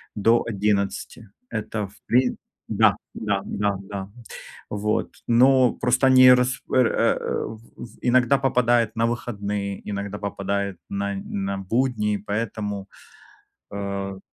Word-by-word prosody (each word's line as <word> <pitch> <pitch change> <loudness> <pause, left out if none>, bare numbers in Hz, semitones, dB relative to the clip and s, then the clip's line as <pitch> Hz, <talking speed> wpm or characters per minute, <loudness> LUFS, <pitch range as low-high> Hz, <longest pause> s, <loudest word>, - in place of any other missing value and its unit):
до 115 +3 +3
11. 105 +1 -1 0.2
Это 110 -2 -3
в 100 - -20
прин 125 +1 +2 0.3
Да. - - +4 0.2
Да, 100 -3 -1
да, 100 -1 -1
да. 95 0 -6 0.6
Вот. 105 +1 -1 0.2
Но 125 +1 +5
просто 125 +2 +2
они 130 -1 +8
рас 125 0 +1
пр, 125 -2 +3
э, - - +2 0.3
в 110 - -7 0.2
в 115 -2 -11
иногда 125 +2 +4
попадают 120 -4 +2
на 115 +1 +2
выходные, 105 -4 -3
иногда 100 0 -4
попадают 100 -1 -3
на 100 0 -2
на 100 0 -3
будни. 105 0 0
Поэтому, 105 -2 -3 0.9
э, 100 -1 -4
105 Hz, 120 wpm, -24 LUFS, 100-120 Hz, 0.9 s, они